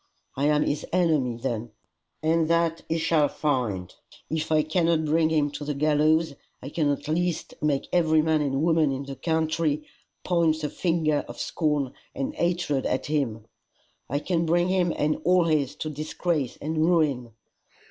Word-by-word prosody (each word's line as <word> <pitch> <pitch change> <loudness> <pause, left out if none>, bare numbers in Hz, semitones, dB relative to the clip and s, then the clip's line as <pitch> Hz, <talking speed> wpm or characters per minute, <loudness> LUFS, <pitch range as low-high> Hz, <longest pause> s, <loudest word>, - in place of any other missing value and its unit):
I 140 - 0
am 150 0 +3
his 145 - -1
enemy 155 -9 +1
then, 115 -2 -4 0.5
and 160 0 +2
that 170 0 +1
he 165 - +1
shall 160 -2 +2
find. 120 - -2 0.4
If 160 0 -2
I 155 -1 +4
cannot 165 0 +1
bring 160 +1 +2
him 150 -2 +1
to 145 0 -6
the 145 0 -3
gallows, 155 +2 +2 0.3
I 135 - -8
can 150 -1 0
at 145 0 -2
least 170 +1 -1
make 145 -2 0
every 160 -3 +4
man 160 -1 +2
and 140 0 0
woman 160 -3 +3
in 135 +1 -3
the 140 0 -7
country 160 -1 0 0.4
point 165 -3 +2
the 150 - -3
finger 160 -4 0
of - - -9
scorn 150 -5 -1 0.2
and 275 +1 -3
hatred 170 - 0
at 130 - -1
him. 130 -8 -1 0.6
I 140 - 0
can 165 +2 -1
bring 175 +2 +2
him 180 -2 +2
and 150 +1 0
all 180 0 +4
his 150 -4 +1
to 155 - -4
disgrace 155 -1 -2
and 155 +2 -3
ruin. 150 -9 +1
155 Hz, 170 wpm, -26 LUFS, 145-165 Hz, 0.6 s, I